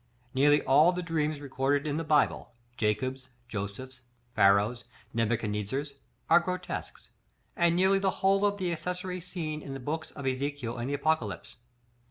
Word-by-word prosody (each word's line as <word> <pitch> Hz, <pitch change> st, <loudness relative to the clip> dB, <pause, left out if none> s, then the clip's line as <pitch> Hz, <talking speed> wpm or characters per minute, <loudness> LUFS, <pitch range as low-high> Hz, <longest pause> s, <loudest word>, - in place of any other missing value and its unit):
Nearly 145 Hz, +2 st, +4 dB
all 150 Hz, +6 st, +6 dB
the 180 Hz, 0 st, -3 dB
dreams 155 Hz, -3 st, -1 dB
recorded 140 Hz, +1 st, 0 dB
in 150 Hz, -1 st, -1 dB
the 165 Hz, -, -1 dB
Bible, 150 Hz, -5 st, +1 dB, 0.2 s
Jacob's, 130 Hz, +4 st, -1 dB, 0.2 s
Joseph's, 115 Hz, +5 st, -6 dB, 0.3 s
Pharaoh's, 105 Hz, +3 st, +3 dB, 0.3 s
Nebuchadnezzar's, 115 Hz, +4 st, -1 dB, 0.3 s
are -, -, +7 dB
grotesques; 180 Hz, +1 st, -5 dB, 0.4 s
and 170 Hz, -1 st, +3 dB
nearly 190 Hz, +2 st, +4 dB
the 195 Hz, 0 st, +2 dB, 0.2 s
whole 195 Hz, +1 st, +4 dB
of 205 Hz, 0 st, +2 dB
the 185 Hz, -3 st, -1 dB
accessary 180 Hz, +2 st, -4 dB
scenery 160 Hz, -4 st, -5 dB
in 135 Hz, -, -6 dB
the -, -, -5 dB
books 160 Hz, +5 st, -4 dB
of 140 Hz, -, -9 dB
Ezekiel 130 Hz, -2 st, -2 dB
and 120 Hz, +3 st, -3 dB
the 145 Hz, -, 0 dB
Apocalypse. 140 Hz, -, -1 dB
145 Hz, 150 wpm, -29 LUFS, 125-170 Hz, 0.4 s, are